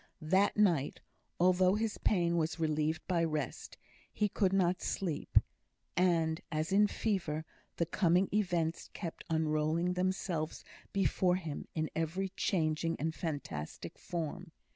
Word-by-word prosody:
That 190 +7 +3
night, 175 -10 +2 0.4
although 185 +1 +4
his 220 0 -1
pain 170 -4 +2
was 160 -1 0
relieved 155 0 0
by 175 -3 +2
rest, 155 -5 -3 0.3
he 210 -1 0
could 195 -1 +1
not 185 -2 +2
sleep; 170 -6 -1 0.6
and, 170 -2 +2
as 155 +3 -1
in 205 +2 +5
fever, 170 -9 -1 0.3
the 170 - +2
coming 180 +2 +3
events 175 -6 0
kept 170 -5 -6
unrolling 160 +2 +1
themselves 180 -3 -1 0.3
before 185 -1 +2
him 165 -6 -5
in 155 -1 -1
every 165 +4 -1
changing 165 -4 0
and 160 +3 -1
fantastic 145 - -5
form. 170 0 -4
170 Hz, 125 wpm, -33 LUFS, 155-185 Hz, 0.6 s, in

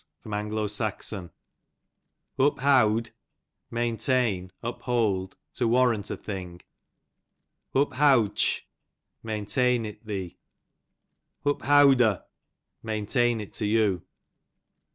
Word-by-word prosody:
Uncoth, 105 0 -3
j 110 0 -2
^ 90 -3 -9 1.1
Uphowd, 125 -5 +3 0.6
maintain, 115 -5 0
uplwld, 115 -6 -1 0.2
to 120 - 0
warrant 115 -3 +2
a - - -4
thing. 90 -4 -7 1.2
Uphowdteh, 135 -5 +3 0.6
maintain 115 +3 0
it 105 +1 -9
thee. 95 -5 -5 1.1
Uphowdo', 140 -7 +4 0.6
maintain 110 +2 0
it 105 - -10
to 105 - -2
you. 105 -4 +2
110 Hz, 75 wpm, -26 LUFS, 105-125 Hz, 1.2 s, Uphowdo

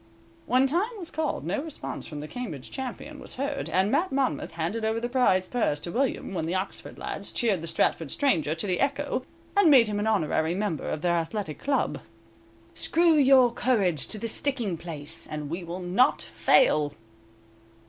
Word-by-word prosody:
When 255 +2 +4
time 345 - +1
was 340 -4 -7
called, 315 -1 -2
no 280 - -1
response 315 -1 -6
from 150 -2 -6
the 150 - -6
Cambridge 165 - -6
champion 265 +3 -6
was - - -9
heard, 275 - -3
and 190 +5 +2
Mat 370 +2 +1
Monmouth 270 -9 -1
handed 170 +8 -2
over 220 +1 0
the 240 - -2
prize 240 -7 +2
purse 225 -12 0
to 170 - -5
William, 260 -3 -1
when 160 -3 -2
the 175 - -1
Oxford 190 +1 -4
lads - - -4
cheered 210 -8 +1
the 165 - -5
Stratford 165 -1 +1
stranger 160 - +1
to 165 - -1
the 185 -3 0
echo, 275 +1 0 0.3
and 400 -5 +6
made 255 -6 +7
him 205 -1 -2
an 210 - -1
honorary 165 -5 +1
member 195 -6 -2
of 155 - -3
their 175 -1 +2
athletic 165 -1 -3
club. 280 -1 0 0.8
_"Screw 335 0 +3
your 270 -4 +6
courage 195 - +1
to 215 - +1
the 230 - -3
sticking 235 -5 -1
place, 160 -1 -6
And 150 -1 -5
we 175 +2 -3
will 175 +2 -6
not 190 +10 +2
fail." 150 - +3
210 Hz, 185 wpm, -27 LUFS, 165-270 Hz, 0.8 s, made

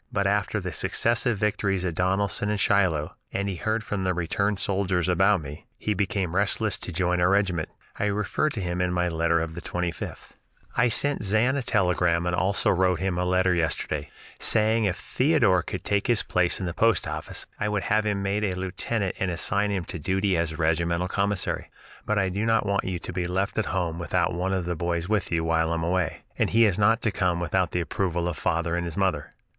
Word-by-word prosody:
But 100 -1 0
after 105 +1 +1
the 90 -2 -4
successive 115 +5 +1
victories 100 -2 0
at 85 - -1
Donelson 95 +4 0
and 105 -1 0
Shiloh, 90 -7 +2 0.2
and 100 +1 -2
he 95 -3 -3
heard 110 +5 -1
from 105 -2 -3
the 95 -1 0
returned 100 +4 0
soldiers 95 -3 0
about 95 +1 +3
me, 75 +2 -9
he 105 - -1
became 95 -3 -1
restless 105 +2 +1
to - - -4
join 90 +1 0
our 90 - +4
regiment. 95 -5 +1 0.3
I - - +1
refer 105 +8 0
to 120 - -5
him 90 0 -2
in 90 -1 0
my 90 0 +1
letter 85 0 +1
of 80 0 -3
the 85 - -7
25th: 90 -1 -4 0.4
"I 120 +1 +3
sent 145 +2 -1
Zan 110 +6 +2
a 140 - 0
telegram 90 -6 +1
and 90 0 0
also 95 +3 +2
wrote 90 -1 +2
him 95 -1 -1
a 90 - 0
letter 90 0 +2
yesterday, 80 -3 -1 0.3
saying 110 0 +4
if 90 -3 +1
Theodore 130 - +2
could - - -6
take 100 +2 0
his 120 -3 +2
place 90 -1 +1
in 95 - -3
the 85 - -3
post 115 +1 +2
office, 75 0 -5
I 105 - 0
would 105 -2 -1
have 110 +1 +2
him 105 -2 -1
made 100 +2 0
a 95 -3 0
lieutenant 95 +2 -2
and 95 - 0
assign 100 +4 0
him 95 -4 -2
to 90 - -6
duty 95 +4 +1
as 80 -2 -1
regimental 85 +2 +1
commissary. 100 0 -1 0.4
But 105 - +1
I 95 -1 +2
do 100 +4 -2
not 115 -1 +2
want 100 0 0
you 95 -1 -2
to 90 - -7
be 90 -1 -1
left 95 +3 -1
at 110 - 0
home 90 -4 -2
without 85 0 0
one 90 +2 -1
of 95 -2 -1
the 90 0 -2
boys 85 +1 -2
with 105 -3 0
you, 80 -1 +1
while 80 0 +1
I 85 - 0
am 80 - -2
away, 90 -1 -1 0.2
and - - +2
he 115 0 +5
is 100 -2 +1
not 110 +3 +3
to 110 - +2
come 90 -3 0
without 85 +1 0
the 90 - -1
approval 85 0 -1
of 85 - -2
father 85 +3 0
and 85 0 -1
his 85 -2 -5
mother. 95 -7 0
95 Hz, 220 wpm, -26 LUFS, 85-100 Hz, 0.4 s, he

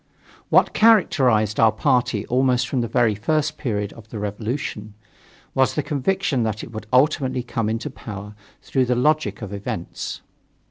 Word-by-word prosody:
What - - +4
characterized 130 - +4
our 110 -1 +6
party 125 -3 +1
almost 125 0 +2
from 130 - -1
the 115 - -1
very 115 -1 +2
first 150 +8 -1
period 105 -6 -2
of 115 -1 -15
the 115 - -7
revolution, 105 0 -4 0.6
was 130 -1 +2
the 150 - 0
conviction 150 -1 0
that 110 -1 -2
it - - -9
would 110 -1 -7
ultimately 130 -1 +2
come 115 -3 -2
into 115 +1 -3
power 105 -1 -8 0.3
through 130 -2 +1
the 125 0 +1
logic 125 -6 +1
of 100 - -6
events. 100 -3 -5
120 Hz, 155 wpm, -22 LUFS, 105-135 Hz, 0.6 s, our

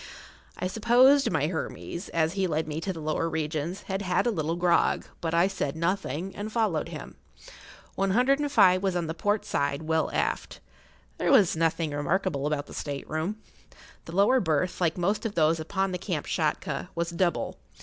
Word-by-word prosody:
I - - -3
supposed 245 +8 +4
my 150 -2 +1
Hermes, 170 +2 -4
as 160 0 +1
he 195 -1 0
led 155 -1 -1
me 155 +1 -4
to 190 - -2
the 170 - -7
lower 155 +2 -1
regions, 160 +3 -3
had 195 0 -3
had 180 +2 +1
a 240 - +2
little 165 -4 -1
grog, 175 0 +2 0.2
but 165 0 -1
I 170 +2 +4
said 170 -8 -3
nothing, 170 0 -2
and 210 +2 -5
followed 215 -9 0
him. - - -9 0.8
One 195 0 0
hundred 255 +7 +3
and 290 -1 -1
five 185 -8 +5
was 190 -2 0
on 175 -1 0
the 160 - -3
port 205 +5 0
side, 140 +1 -1
well 160 0 +1
aft. - - -2 0.6
There - - +2
was 190 -5 +5
nothing 165 -1 0
remarkable 145 0 -1
about 150 -1 -1
the - - -12
state 140 -2 -5
room. 170 +8 -3 0.6
The 165 - -8
lower 205 +7 +5
berth, 170 - 0
like 165 -1 +1
most 195 +4 0
of 225 -3 -3
those 160 0 +3
upon 190 +4 -1
the 180 - -3
Kamtschatka, 155 -3 -2
was 170 0 -1
double. 175 0 -1
170 Hz, 185 wpm, -27 LUFS, 160-195 Hz, 0.8 s, five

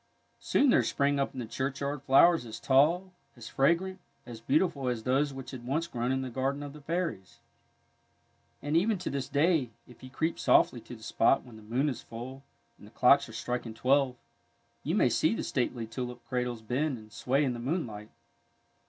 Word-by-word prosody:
Soon 280 -3 +3
there - - +5
sprang 140 0 +1
up 140 - 0
in - - -5
the 120 - -3
churchyard 140 +4 -3
flowers 145 +4 +5
as 110 -2 -8
tall, 165 +8 +3 0.3
as 115 -1 -9
fragrant, 175 +7 +1 0.3
as 115 -2 -9
beautiful 140 +2 +1
as 120 -3 -2
those 135 +4 +1
which 135 -1 -8
had 130 -3 -8
once 145 +7 -1
grown 125 -6 -2
in 130 0 0
the 130 - -4
garden 135 +3 -2
of 145 -1 -7
the 150 - -12
fairies. 165 - -3 1.3
And 145 +2 -1
even 200 +5 +3
to 180 - -4
this 135 -1 -3
day, 145 -2 +2 0.2
if 125 - -17
you 130 - -10
creep 160 +5 -2
softly 120 - +3
to 120 - -10
the 110 - -15
spot 115 +4 +2
when 120 -3 -14
the 110 - -12
moon 120 +7 -1
is 130 -5 -3
full 125 +4 -8 0.4
and - - -14
the - - -16
clocks - - +4
are - - -11
striking 120 -2 -4
twelve, 135 +1 +2 0.7
you - - -1
may - - +4
see - - +2
the - - -3
stately 120 -3 -2
tulip 120 +1 -6
cradles 125 -2 -2
bend 130 +4 -1
and 110 0 -15
sway 135 +4 +1
in 130 -3 0
the 120 - -6
moonlight. 120 - -3
130 Hz, 195 wpm, -29 LUFS, 120-145 Hz, 1.3 s, there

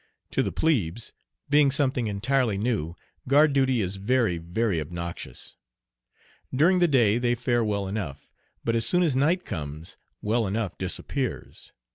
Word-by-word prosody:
To - - +1
the - - -1
plebes, 115 - -1 0.3
being 145 -1 +4
something 130 -4 +1
entirely 115 +1 0
new, 100 -7 -1 0.3
guard 145 +2 +5
duty 130 -3 +2
is 95 0 -2
very, 105 -4 +1
very 90 +1 -1
obnoxious. 85 -4 -7 1.0
During 170 +8 +3
the 175 - +4
day 120 -7 +3
they 120 0 +1
fare 120 -1 0
well 100 -2 -1
enough, 95 -9 -6 0.3
but 115 - 0
as 115 - +2
soon 180 +10 +4
as 155 -6 +1
night 165 +7 +2
comes 75 -3 -6 0.2
"well 110 +1 0
enough" 100 -2 -2
disappears. 125 +8 -4
115 Hz, 145 wpm, -26 LUFS, 95-135 Hz, 1.0 s, guard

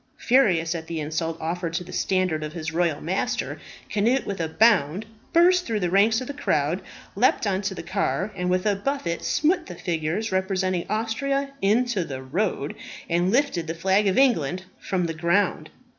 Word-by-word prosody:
Furious 185 -11 +3
at 160 -1 -6
the 165 -1 -3
insult 160 +2 -2
offered 170 +1 -3
to 180 - -1
the 180 - -11
standard 185 -5 0
of 150 0 -5
his 160 -2 -5
royal 170 -3 +1
master, 180 +5 -2 0.3
Cnut, 235 +6 +2
with 195 -3 -3
a 165 - 0
bound, 195 -1 +3 0.3
burst 360 +1 +4
through 225 -2 0
the 175 -1 0
ranks 215 +4 +4
of - - -4
the 285 - -5
crowd, 165 - 0 0.3
leaped 230 +2 +3
on 195 -1 0
to 195 -1 -3
the - - -6
car, 195 +1 -1
and 180 -1 -2
with 185 +1 +1
a 205 -1 +3
buffet 200 - -2
smote 325 +4 +1
the 180 - -7
figure 165 +1 -2
representing 190 -1 0
Austria, 275 +6 -1
into 215 0 +2
the 135 -4 -6
road, 150 0 -1 0.3
and 175 +2 +1
lifted 245 - +1
the 165 - -3
flag 190 +4 +2
of 190 - +1
England 185 - +2 0.2
from 185 -2 -1
the 165 - -2
ground. 170 -1 +1
185 Hz, 185 wpm, -24 LUFS, 165-215 Hz, 0.3 s, burst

